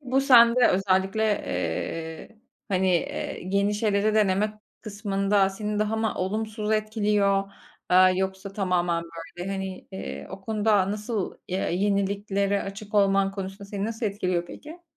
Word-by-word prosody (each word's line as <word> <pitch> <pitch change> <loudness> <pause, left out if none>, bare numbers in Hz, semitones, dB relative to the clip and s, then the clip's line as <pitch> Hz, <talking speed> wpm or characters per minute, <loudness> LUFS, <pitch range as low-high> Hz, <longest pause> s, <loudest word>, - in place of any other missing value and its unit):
Bu 265 -1 +1
sende 245 -2 +6
özellikle, 190 +2 +1
eee, 160 - -3 0.3
hani, 190 -1 +1
eee, 175 -2 -2
yeni, 200 +1 +2
şeyleri 210 0 +1
denemek 210 0 +2 0.3
kısmında 200 -2 0
seni 210 +1 -3
daha 215 +1 0
mı 220 0 0
olumsuz 215 +2 -2
etkiliyor, 205 -2 +1 0.4
aaa, 185 +1 +6
yoksa 190 +1 -3
tamamen 180 -4 0 0.4
böyle 180 +2 -4
hani, 190 -1 -5
iii, 190 - -6
o 190 - -8
konuda 210 -1 +1
nasıl 210 -1 -3
ya 185 +1 -1
yeniliklere 200 +1 0
açık 200 +2 -8
olman 195 -1 +3
konusunda 195 0 -6
seni 200 0 -4
nasıl 225 +1 -2
etkiliyor 185 -4 -1
peki? 320 - -11
200 Hz, 130 wpm, -26 LUFS, 190-215 Hz, 0.4 s, sende